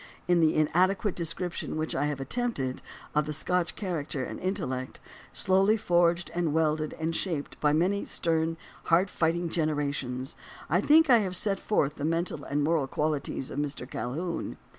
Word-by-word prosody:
In 175 -1 +4
the 160 -1 +4
inadequate 185 +6 +2
description 170 -1 -3
which 155 0 -2
I 145 - +1
have 145 -2 -3
attempted 135 - -2 0.3
of 150 0 +1
the 150 - -2
Scotch 175 +3 0
character 155 -8 -3
and - - -6
intellect, 170 -10 -3 0.3
slowly 195 +3 +3
forged 175 -4 +2
and 170 -3 0
welded 155 -1 +1
and 160 +1 -2
shaped 160 -7 -2
by 150 - +3
many 180 +6 +1
stern, 165 0 0 0.3
hard 180 +3 +3
fighting 170 +1 +1
gener 155 -2 0
ations, 135 -3 -3 0.4
I 175 +4 +4
think 310 +3 +6
I 240 - +8
have 190 -3 -2
set 195 +1 0
forth 150 -8 0
the 140 - -5
mental 165 +2 -1
and 145 +1 -1
moral 155 -3 +2
qualities 150 -2 -2
of 140 - -3
Mr. 140 -3 -3
Calhoun. 155 +10 -4
165 Hz, 165 wpm, -28 LUFS, 150-180 Hz, 0.4 s, I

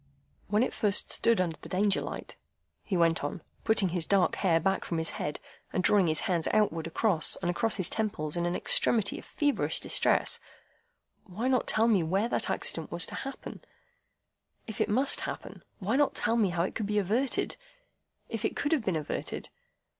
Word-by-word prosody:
"When 210 +3 +2
it - - -2
first 205 -2 +1
stood 230 -3 +2
under 170 -3 -1
the - - -10
Danger 200 +1 +1
light," - - -7 0.5
he 190 - -2
went 165 -2 +2
on, 145 +3 -4 0.2
putting 215 -4 +2
his 175 -1 0
dark 195 -2 +2
hair 170 -4 +2
back 190 +4 0
from 170 - -3
his 160 0 +1
head, 150 - -4 0.3
and 185 - -1
drawing 195 -3 +4
his 155 -1 +1
hands 170 -4 -1
outward 165 -7 +1
across 165 -1 +2
and 175 -1 -2
across 225 +5 0
his 185 -5 +1
temples 180 -9 -2
in 175 0 0
an 175 - -1
extremity 220 -4 +2
of - - -13
feverish 290 -2 0
distress, - - +2 0.9
"why 210 +6 -4
not 255 -2 +1
tell 225 +1 +3
me 210 -6 +3
where 190 +7 0
that - - 0
accident - - -1
was - - +3
to - - -8
happen,—if 275 - -11
it - - +1
must 260 +6 +3
happen? - - -7 0.2
Why 215 +6 -1
not 290 -1 +2
tell 230 - +1
me 215 -5 +2
how 170 -1 0
it 185 - -3
could 215 - -3
be 210 0 -1
averted,—if 270 - -3
it - - -1
could 290 - -1
have 305 -7 +2
been 190 -5 -1
averted? 150 -2 -4
200 Hz, 185 wpm, -29 LUFS, 175-225 Hz, 0.9 s, drawing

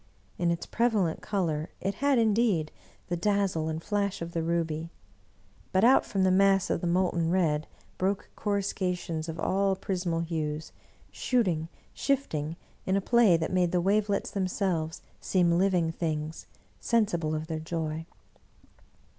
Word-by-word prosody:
In 175 - +2
its 170 0 -1
prevalent 215 -8 +1
color 170 -7 -1
it 195 +1 -1
had, 280 +4 +2
indeed, 215 -8 +2 0.3
the 175 - -2
dazzle 190 -4 +1
and 160 +1 -4
flash 205 -2 -1
of 170 0 -5
the 165 - -1
ruby; 165 -1 -1 0.8
but 190 +2 +2
out 255 +3 +5
from 195 -2 0
the 190 - +4
mass 195 0 +4
of - - 0
the 175 - -1
molten 175 -2 +1
red, 160 -4 +1 0.3
broke 190 +2 -1
coruscations 180 -5 -2
of 165 +1 -5
all 195 +2 +1
prismal 180 -3 -2
hues, 155 -2 -3 0.4
shooting, 180 -11 0 0.2
shifting, 165 - -1 0.3
in 190 - 0
a - - +3
play 215 -3 +4
that 165 +2 -3
made 180 -2 +2
the 180 - +2
wavelets 200 +2 +1
themselves 185 -4 -1 0.2
seem 180 -3 +2
living 175 -2 +2
things, 160 -1 -3 0.3
sensible 170 -9 +1
of 155 0 -3
their 160 -1 -3
joy. 160 0 -3
180 Hz, 145 wpm, -28 LUFS, 160-200 Hz, 0.8 s, out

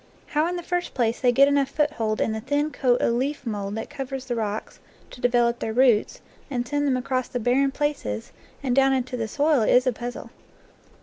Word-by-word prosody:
How 305 +2 +1
in 355 - -2
the 350 - -5
first 355 +1 -3
place 235 -2 0
they 250 -2 +3
get 275 +3 +5
enough 280 -1 +2
foothold 275 -8 0
in - - +1
the 220 0 -3
thin 290 +5 0
coat 250 -4 +1
of 235 - +2
leaf 265 +4 -2
mould 205 -3 -3
that 220 - -5
covers 270 -2 -5
the 245 -2 -2
rocks 215 -2 -4 0.3
to 245 - -12
develop 240 -1 +2
their 220 - -3
roots 240 -3 +3 0.3
and 245 -3 -2
send 290 +1 0
them 260 -2 +2
across 255 0 -1
the 245 - -3
barren 255 +4 +2
places 270 - -3 0.3
and 250 -3 0
down 270 0 +4
into 255 -1 -1
the 225 -2 -2
soil 290 +3 +2
is 250 +3 +4
a 255 - +2
puzzle. 240 +2 -7
255 Hz, 210 wpm, -24 LUFS, 235-280 Hz, 0.3 s, get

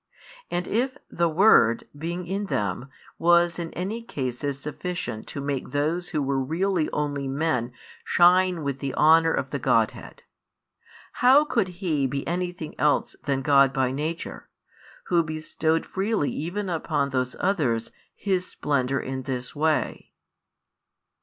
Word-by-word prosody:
And 175 0 -2
if 260 +5 0
the 170 0 +1
Word, 155 - +4
being 170 +4 -4
in 195 +3 -3
them, 105 - -2 0.3
was 170 0 +4
in 165 -1 -4
any 200 +6 -3
cases 135 - -4
sufficient 150 -5 -5
to - - -5
make 140 -1 -3
those 160 +5 -1
who 155 -5 -1
were 135 0 0
really 170 +3 0
[only] 145 -2 -2
men 135 -4 -1 0.3
shine 180 -1 +4
with 140 -1 -3
the 135 -1 -3
honour 160 +1 +5
of - - -2
the - - -2
Godhead; - - 0 0.9
how 270 +4 +5
could 230 -9 +1
He 170 -6 -1
be 140 +1 -3
anything 175 -2 -3
else 150 -1 +2
than 135 -2 0
God 140 -1 +5
by 130 -2 +1
Nature, 155 +5 -4 0.6
Who 170 - +4
bestowed 155 0 -1
freely 200 -5 -1
even 185 +7 -3
upon 155 -5 -1
those 130 -1 -1
others 140 - 0 0.2
His 185 -3 -1
splendour 135 -2 -1
in 130 0 -4
this 125 0 -5
way? 155 +1 -1
155 Hz, 140 wpm, -25 LUFS, 140-180 Hz, 0.9 s, honour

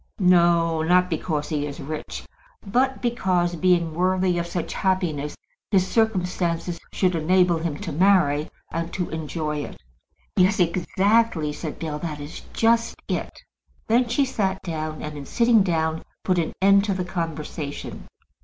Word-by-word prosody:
"No; 170 -3 +4
not 180 +2 +3
because 155 -2 -2
he 150 -2 -1
is 145 +1 -7
rich. 155 +1 -6 0.4
But 255 +7 +1
because, 185 -7 +1
being 170 -2 +2
worthy 185 +1 +1
of 170 - -3
such 170 -1 -3
happiness, 170 -7 -1 0.3
his 190 -3 +3
circumstances 180 -5 0
should 185 -2 +1
enable 175 +1 +3
him 160 -3 -3
to - - -4
marry, 160 -4 +3 0.2
and 165 +1 -3
to 180 -2 -3
enjoy 155 -1 -3
it." 145 - -6 0.6
"Yes, 190 +2 +3
exactly," 185 0 +2
said 155 0 -6
Bell. 155 -2 -4
"That 150 -2 -5
is 145 +2 -8
just 230 +1 +2
it." - - -4 0.5
Then 235 +1 +3
she 275 +4 +2
sat 195 -7 -1
down, 155 -2 -4
and 150 0 -5
in 140 -2 -8
sitting 235 -2 +4
down 160 -3 0 0.2
put 180 -2 +2
an 165 - -2
end 200 0 +6
to 200 -2 0
the 185 -1 -2
conversation. 160 -4 -5
175 Hz, 150 wpm, -24 LUFS, 160-190 Hz, 0.6 s, end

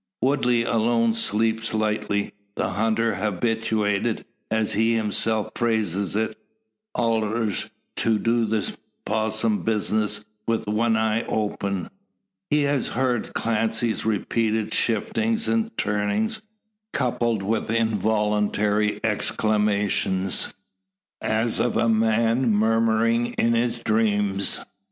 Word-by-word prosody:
Woodley 125 -3 +2
alone 115 0 +2
sleeps 115 0 0
lightly; 105 -1 -1 0.2
the - - -1
hunter 110 +3 +1
habituated, 110 +1 0 0.2
as 110 -1 0
he 115 +2 +2
himself 110 0 +1
phrases 105 -5 0
it, 110 0 0 0.6
"allers 110 -2 0 0.3
to 110 -1 +2
do 115 +1 +1
the 110 -1 -1 0.3
possum 110 0 0
bizness, 105 -1 0 0.2
wi' 115 0 +2
one 110 +2 +1
eye 110 0 +1
open." 100 -3 -2 0.6
He 150 -1 +3
has 140 -2 +1
heard 125 -2 -1
Clancy's 115 0 0
repeated 110 0 0
shiftings 225 - 0
and 225 0 0
turnings, 105 - 0 0.5
coupled 120 -5 0
with 110 +2 -1
involuntary 105 -1 +1
exclamations, 105 -3 0 0.7
as 110 +1 0
of 120 - +1
a 115 +1 +2
man 115 +2 +2
murmuring 115 +2 +2
in 115 0 +2
his 120 0 0
dreams. 105 -3 +1
110 Hz, 100 wpm, -24 LUFS, 105-115 Hz, 0.7 s, He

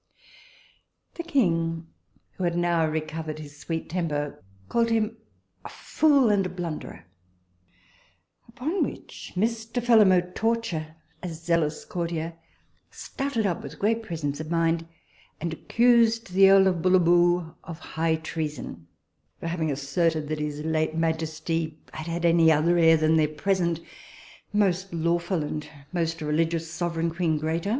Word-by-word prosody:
The - - -5
king, 165 - 0 0.5
who 185 - -6
had 175 -1 0
now 170 -2 +2
recovered 155 0 -4
his 150 -2 -10
sweet 165 +1 -4
temper, 150 - -3 0.2
called 230 0 +1
him 225 -1 +1 0.5
a - - -8
fool 280 -7 +3
and 190 -3 0
blunderer, 170 -4 -6 1.4
upon 275 +11 -1
which - - -7
Mr. 225 +4 -1
Phelim 225 -5 +6
O'Torture, 180 -3 0 0.3
a 180 - -4
zealous 165 -1 -1
courtier, 170 -1 -3 0.6
started 270 -5 -3
up 180 -4 -1
with - - -9
great 225 +3 +1
presence 155 -8 -4
of 155 0 -6
mind 165 0 +1 0.5
and 165 0 -3
accused 230 +2 +3
the 195 +1 +7
earl 195 0 +7
of 180 -3 +1
Bullaboo 175 -1 +3
of 165 -2 -8
high 160 -1 -1
treason, 150 - -5 0.5
for - - -8
having 165 -2 -1
asserted 155 +2 0
that 155 -1 -2
his 150 0 -3
late 155 0 0
majesty 160 0 -1 0.2
had 155 +1 -6
had 170 +1 -2
any 165 -1 +5
other 160 +3 +3
heir 165 -1 +6
than 155 +1 +3
their 155 -1 +3
present 170 +2 0 0.7
most 195 -2 +1
lawful 170 +1 0
and 150 0 -5 0.2
most 165 -2 -1
religious 165 +2 0
sovereign 170 -1 -1
queen 165 -2 +1
Grata. 160 +5 -2
165 Hz, 135 wpm, -26 LUFS, 160-185 Hz, 1.4 s, the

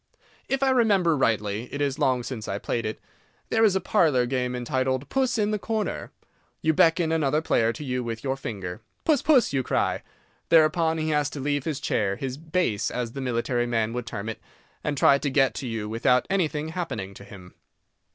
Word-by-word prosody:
If 270 0 0
I 265 - +4
remember 200 -10 +3
rightly—it 115 0 -1
is 145 0 -1
long 130 -4 +2
since 115 -4 -6
I 100 - -2
played 115 +2 -2
it—there 225 - -4
is 205 -4 +4
a - - +3
parlour 155 - +2
game 125 0 -1
entitled 130 +2 -1
"Puss 260 -3 +1
in 210 -1 +1
the 210 - -1
Corner." 220 0 -3 0.5
You 160 - +3
beckon 165 +1 +3
another 155 -2 +2
player 115 -7 +2
to 150 - -8
you 125 -2 -2
with 115 -1 -5
your 135 -1 0
finger. 95 -9 -6 0.2
"Puss, 300 -5 +3
puss!" 270 - +4
you 135 - +2
cry. - - 0 0.5
Thereupon 160 0 +4
he 155 0 -1
has 150 -2 +1
to 145 - -7
leave 145 0 -1
his 150 -4 -2
chair—his 115 +4 -1
"base," 155 - -1
as 120 -2 -3
the 135 - -6
military 120 -1 0
man 115 -1 0
would 120 -1 -4
term 100 0 -5
it—and 145 +5 -7
try 140 +1 +5
to 145 - -1
get 135 -1 +3
to 135 - -5
you 110 -2 -3
without 115 +3 +2
anything 155 -5 0
happening 135 - -4
to 100 - -12
him. 95 -3 -13
135 Hz, 190 wpm, -25 LUFS, 115-160 Hz, 0.5 s, try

